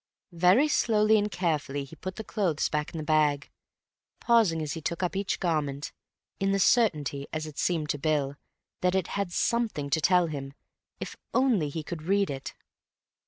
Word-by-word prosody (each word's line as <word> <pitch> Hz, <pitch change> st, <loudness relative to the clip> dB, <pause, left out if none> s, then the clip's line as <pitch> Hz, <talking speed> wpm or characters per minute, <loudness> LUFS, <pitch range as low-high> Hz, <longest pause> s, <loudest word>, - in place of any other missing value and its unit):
Very 180 Hz, -, +4 dB
slowly 220 Hz, -6 st, +3 dB
and 205 Hz, 0 st, -1 dB
carefully 155 Hz, -6 st, -1 dB
he 140 Hz, +4 st, -12 dB
put 185 Hz, +5 st, -6 dB
the 220 Hz, -, -6 dB
clothes 190 Hz, -8 st, 0 dB
back 150 Hz, 0 st, -2 dB
in -, -, -7 dB
the 155 Hz, -, -3 dB
bag, 150 Hz, -2 st, +1 dB, 0.7 s
pausing 225 Hz, -9 st, +3 dB
as 150 Hz, -, -3 dB
he 165 Hz, -, -6 dB
took 170 Hz, +4 st, -3 dB
up 180 Hz, -, -1 dB
each 195 Hz, 0 st, -1 dB
garment, 145 Hz, -5 st, -1 dB, 0.5 s
in 195 Hz, 0 st, +1 dB
the 195 Hz, -, +2 dB
certainty, 150 Hz, -, +2 dB
as 155 Hz, 0 st, -3 dB
it 155 Hz, -2 st, -8 dB
seemed 160 Hz, -4 st, 0 dB
to 145 Hz, -, -4 dB
Bill, 145 Hz, -2 st, 0 dB, 0.4 s
that 180 Hz, 0 st, +1 dB
it 190 Hz, -3 st, 0 dB
had 200 Hz, -3 st, -2 dB
something 215 Hz, -, 0 dB
to 160 Hz, -, +2 dB
tell 180 Hz, +2 st, +4 dB
him 140 Hz, -3 st, -6 dB, 0.4 s
if -, -, -6 dB, 0.2 s
only 235 Hz, -, +3 dB
he 155 Hz, +2 st, -5 dB
could 165 Hz, 0 st, -6 dB
read 195 Hz, +2 st, +1 dB
it. 135 Hz, -1 st, -6 dB
165 Hz, 180 wpm, -28 LUFS, 150-195 Hz, 0.7 s, Very